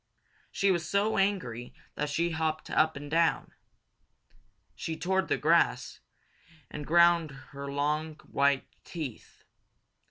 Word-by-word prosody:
She 195 0 +2
was 170 -2 -1
so 200 +1 +1
angry 145 - -1 0.2
that 150 0 -2
she 170 +3 0
hopped 160 -1 -2
up 160 0 +3
and 145 +1 -8
down. 165 0 +2 1.2
She 160 -1 -5
tore 190 +2 0
up 190 - -1
the - - +1
grass 155 -6 +2 0.7
and 150 -1 -6
ground 170 -1 +5 0.2
her 140 0 -6
long, 150 +2 -1
white 140 -1 +1 0.2
teeth. 150 -10 -8
160 Hz, 125 wpm, -29 LUFS, 145-170 Hz, 1.2 s, ground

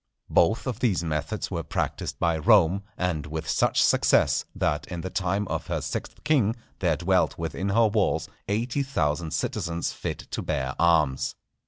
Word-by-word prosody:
Both 105 +7 +3
of 125 -5 -3
these 100 -8 +1
methods 80 +6 -3
were 85 -3 -2
practised - - -3
by 85 -1 +1
Rome, 100 -1 +4 0.2
and 85 -5 -1
with 80 +1 -5
such - - +2
success, - - +3
that 75 - -1
in 85 -2 -5
the 95 - -5
time 95 +1 -1
of - - -3
her - - -1
sixth - - -5
king 130 -8 +2 0.2
there 85 -5 +1
dwelt 90 0 +1
within 85 +4 -3
her 115 +3 +4
walls 105 -2 +1 0.2
eighty 115 +7 0
thousand 80 - -1
citizens 85 +2 -2
fit - - -4
to - - -2
bear 70 -3 -2
arms. 75 -6 +2
90 Hz, 165 wpm, -26 LUFS, 80-105 Hz, 0.2 s, Rome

